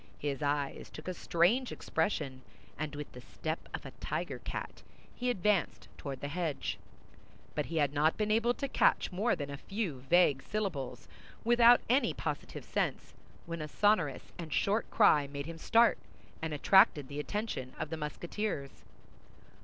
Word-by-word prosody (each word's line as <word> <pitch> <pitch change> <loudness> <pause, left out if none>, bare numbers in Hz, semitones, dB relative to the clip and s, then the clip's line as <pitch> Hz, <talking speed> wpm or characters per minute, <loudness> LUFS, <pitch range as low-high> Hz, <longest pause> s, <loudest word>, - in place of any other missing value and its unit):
His 145 -1 -3
eyes 145 -1 -1
took 155 - -10
a 185 - -1
strange 185 +10 +2
expression, 150 -6 -2 0.3
and 150 0 -4
with 150 0 -6
the 125 - -10
step 160 +5 -5
of - - -6
a - - -7
tiger - - -3
cat - - -6 0.3
he 250 0 -2
advanced 205 -5 0
toward 135 -3 -6
the 145 - -3
hedge; 160 -1 -2 0.7
but 150 - -2
he 165 - -3
had 145 -2 +2
not 150 +2 +2
been 215 0 0
able 230 +3 +3
to 275 - -3
catch - - +3
more 205 +6 +1
than 145 -1 -5
a 140 - -5
few 195 - -3
vague 170 -6 +5
syllables 140 - -3 0.4
without 240 +1 +7
any 255 +4 +3
positive - - -4
sense, - - -2 0.3
when 170 -1 -5
a 155 - -4
sonorous 165 -6 +1
and 165 -2 -6
short 210 +3 +1
cry 150 -10 +5
made 140 0 -5
him 165 0 -7
start, 230 +6 +4 0.4
and 160 0 -2
attracted 150 - +5
the 145 +1 -5
attention 175 - -3
of 155 - -4
the 160 - -2
Musketeers. 155 0 -4
160 Hz, 160 wpm, -32 LUFS, 145-210 Hz, 0.7 s, without